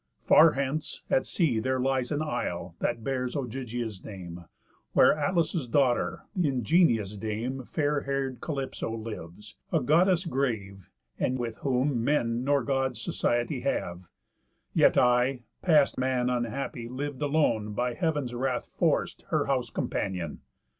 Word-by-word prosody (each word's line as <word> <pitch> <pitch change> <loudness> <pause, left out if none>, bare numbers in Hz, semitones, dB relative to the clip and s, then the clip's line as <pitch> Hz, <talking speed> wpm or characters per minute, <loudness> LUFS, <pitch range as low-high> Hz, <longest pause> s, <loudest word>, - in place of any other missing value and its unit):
Far 160 0 +7
hence, 140 +3 -3
at 130 - +2
sea, 145 - +1
There 130 +3 0
lies 130 0 0
an 150 +1 0
isle, 90 - -3
that 115 -1 -1
bears 125 -1 -2
Ogygia's 120 -5 -4
name, 90 -4 -8 0.5
Where - - +6
Atlas' 160 -1 0
daughter, 120 -8 +1
the 180 -5 +2
ingenious 120 - +2
dame, 115 +5 -3
Fair 145 0 0
hair'd 135 -3 -2
Calypso 135 -7 -3
lives; 105 -3 -8
a 165 - +3
Goddess 170 +6 +3
grave, 110 - -2 0.3
And 130 - 0
with 115 -3 -4
whom 130 -2 0
men 120 -3 +1
nor 140 -1 +2
Gods 130 -2 0
society 120 +3 0
have; 90 -9 -2 0.7
Yet - - +4
I, 125 +1 +3 0.2
past 150 -7 +4
man 125 -1 +1
unhappy, 120 0 -3
liv'd 140 +2 -5
alone, 140 -8 +1
By 120 +3 -1
Heav'n's 145 -4 -1
wrath 125 +1 -2
forc'd, - - 0
her - - +1
house 130 -4 0
companion. 90 -8 -3
125 Hz, 135 wpm, -28 LUFS, 115-140 Hz, 0.7 s, Far